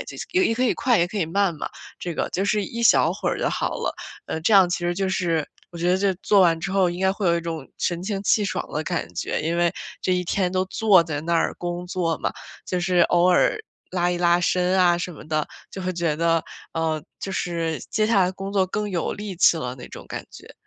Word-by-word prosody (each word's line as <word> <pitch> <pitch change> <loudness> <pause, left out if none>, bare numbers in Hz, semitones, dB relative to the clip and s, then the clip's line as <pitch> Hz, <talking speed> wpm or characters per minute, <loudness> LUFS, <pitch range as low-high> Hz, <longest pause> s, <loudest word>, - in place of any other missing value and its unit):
呃 - - -5 0.3
也 375 0 +3
也 225 - +1
可 250 - -1
以 245 - +3
快 245 -4 +2
也 170 - +3
可 210 - -4
以 170 - 0
慢 190 +1 +1
嘛 150 - -5 0.3
这 175 -2 -4
个， - - -1
就 195 - -1
是 205 0 +1
一 235 +4 -5
小 - - +5
会 - - -3
儿 - - -2
就 - - +1
好 - - -1
了。 - - -2 0.3
呃 160 - -3
这 215 - +2
样 190 -2 +7
其 175 - -1
实 175 0 -1
就 190 0 -1
是 170 -5 0 0.2
我 170 - -9
觉 175 +1 +1
得 185 - +4
这 195 0 +2
做 205 - +4
完 170 -3 +4
之 195 - -3
后 190 -2 +3
应 175 +1 -6
该 190 0 +3
会 200 -1 -2
有 170 0 +4
一 - - -1
种 165 -4 -5
神 175 0 -1
清 195 0 -3
气 205 +1 +3
爽 185 -1 -2
的 155 - -1
感 85 - -3
觉， 85 - -2
因 165 +2 -1
为， 170 0 +2 0.3
这 185 - +1
一 180 0 -1
天 180 +1 0
都 185 0 +1
坐 200 -3 +4
在 155 -3 -4
那 170 +2 -1
儿 - - +1
工 175 0 -4
作 170 -3 -1
嘛， - - -2 0.3
就 180 -1 -1
是 180 0 +1
偶 175 +1 +4
尔 180 - +4 0.3
拉 175 -1 +1
一 175 - -1
拉 175 0 +3
伸 180 +1 +2
啊 175 -1 +4
什 175 +1 -4
么 150 - -12
的， 155 -1 0 0.2
就 190 - -7
会 185 0 -1
觉 170 -3 -1
得， 165 0 +2 0.3
呃， 160 -2 -1 0.2
就 195 - -4
是 165 -3 -2
接 215 -2 +1
下 210 -4 +4
来 180 - +2
工 195 +1 -6
作 190 -2 +2
更 210 +2 -3
有 175 -3 -1
力 205 -3 -6
气 170 - +5
了 125 -5 -4
那 125 - -9
种 - - -10
感 - - -5
觉。 - - -13
180 Hz, 280 characters per minute, -23 LUFS, 170-195 Hz, 0.3 s, 样